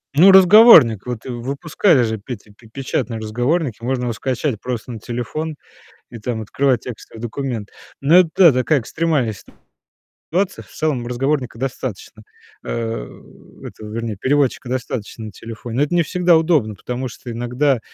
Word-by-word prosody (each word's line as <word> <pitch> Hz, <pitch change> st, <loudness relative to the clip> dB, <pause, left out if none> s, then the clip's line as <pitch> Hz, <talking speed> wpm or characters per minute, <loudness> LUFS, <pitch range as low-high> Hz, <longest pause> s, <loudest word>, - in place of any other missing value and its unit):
ну, 180 Hz, +6 st, +8 dB
разговорник. 190 Hz, -, +8 dB
Вот 125 Hz, -2 st, -5 dB
выпускали 135 Hz, -, +1 dB
же, 110 Hz, -1 st, -1 dB
Петя, 105 Hz, 0 st, -9 dB
пе 115 Hz, +2 st, -19 dB
печатные 125 Hz, -2 st, -3 dB
разговорники, 120 Hz, +4 st, -1 dB
можно 125 Hz, 0 st, -1 dB
его 120 Hz, -1 st, -1 dB
скачать 130 Hz, 0 st, -2 dB
просто 125 Hz, 0 st, -5 dB
на 110 Hz, -, -7 dB
телефон 125 Hz, +8 st, -4 dB, 0.6 s
и, 115 Hz, -, -9 dB
там, 110 Hz, +1 st, -3 dB
открывать 130 Hz, +3 st, 0 dB
текстовый 115 Hz, -2 st, -10 dB
документ. 120 Hz, -2 st, -4 dB, 0.3 s
Но 150 Hz, +6 st, +5 dB
это, 180 Hz, -3 st, +3 dB
да, 175 Hz, -5 st, +8 dB
такая 130 Hz, +3 st, +1 dB
экстремальная 150 Hz, -4 st, -1 dB, 0.8 s
ситуация. 185 Hz, +3 st, -3 dB
В -, -, -23 dB
целом 145 Hz, -6 st, -2 dB
разговорника 125 Hz, -1 st, -2 dB
достаточно, 120 Hz, -5 st, -5 dB, 0.4 s
э, -, -, -6 dB
этого, 110 Hz, -, -7 dB
вернее, 115 Hz, -1 st, -3 dB
переводчика 135 Hz, +1 st, 0 dB
достаточно 120 Hz, -3 st, -4 dB
на 105 Hz, -, -8 dB
телефоне, 115 Hz, +3 st, -8 dB
но 140 Hz, -, +3 dB
это 150 Hz, -, -2 dB
не 170 Hz, -, +4 dB
всегда 175 Hz, +1 st, +3 dB
удобно, 155 Hz, -10 st, +1 dB
потому 125 Hz, +6 st, -5 dB
что 120 Hz, -, -11 dB
иногда, 125 Hz, +3 st, 0 dB
125 Hz, 150 wpm, -19 LUFS, 115-150 Hz, 0.8 s, ну